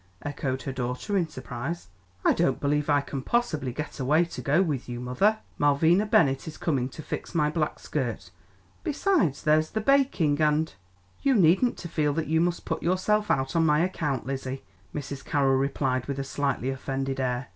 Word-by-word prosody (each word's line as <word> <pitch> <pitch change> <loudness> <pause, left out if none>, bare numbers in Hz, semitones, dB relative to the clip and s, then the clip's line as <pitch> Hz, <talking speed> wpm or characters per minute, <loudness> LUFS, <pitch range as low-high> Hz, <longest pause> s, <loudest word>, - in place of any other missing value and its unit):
echoed 130 -2 -3
her 135 - -3
daughter 125 - -3
in 180 -4 +2
surprise. 130 - -6 0.4
"I - - +6
don't 175 - +1
believe 145 +1 0
I 145 -1 +4
can 140 -1 -5
possibly 155 - 0
get 150 +4 -6
away 150 +6 +3
to 170 - -7
go 145 +3 +2
with 145 -8 -3
you, 120 0 -4
mother. 160 - +2 0.2
Malvina 160 +8 +4
Bennett 165 - +3
is 160 - -7
coming 130 -6 0
to 155 - -9
fix - - -6
my 150 -2 +2
black 155 -2 -1
skirt; 120 -10 -4 0.5
besides, 300 - +1
there's 155 0 +3
the 220 - -2
baking 215 - +2
and 155 +1 +2 0.2
" 90 +1 -33
"You 275 -2 +3
needn't 190 +6 +4
to 170 - -6
feel 150 -3 0
that 160 +1 -1
you 160 +2 +2
must 175 0 -1
put 160 - -2
yourself 210 +4 +1
out 135 +2 0
on 165 - +4
my 150 -1 +4
account, 155 -8 -1
Lizzie," 135 0 -4 0.3
Mrs. 140 -1 -6
Carroll 135 -2 +2
replied 135 -2 0
with 140 -1 -3
a 135 - -2
slightly 135 -2 -1
offended 135 0 -3
air. 125 0 -1
145 Hz, 190 wpm, -27 LUFS, 135-170 Hz, 0.5 s, I